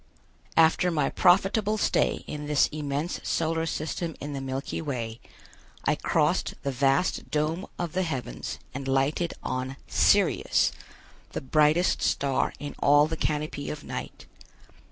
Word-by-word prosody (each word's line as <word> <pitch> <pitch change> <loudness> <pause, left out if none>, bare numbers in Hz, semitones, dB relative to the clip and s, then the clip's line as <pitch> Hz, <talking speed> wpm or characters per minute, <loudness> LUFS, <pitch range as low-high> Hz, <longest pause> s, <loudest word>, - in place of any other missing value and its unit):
After 165 +2 +5
my 150 -5 0
profitable 200 +4 +3
stay - - +1
in 150 0 -6
this 150 -1 +4
immense 150 +2 -3
solar 165 0 0
system 160 +1 -3
in 145 0 -5
the 135 - -4
Milky 135 +3 -4
Way, 120 -6 -4 0.7
I - - +3
crossed - - +1
the 140 - -1
vast 135 +6 +1
dome 155 +5 -1
of 175 -3 -3
the 185 - +1
heavens 130 - -4 0.2
and 135 +1 -5
lighted 135 +6 +1
on 130 +1 -3
Sirius, - - +3 0.6
the - - -3
brightest 155 +5 +3
star 140 -2 +1
in 145 -1 -6
all 145 +1 +5
the 160 +1 -3
canopy 150 -2 -2
of 150 -1 -6
night. - - -7
150 Hz, 135 wpm, -27 LUFS, 135-165 Hz, 0.7 s, After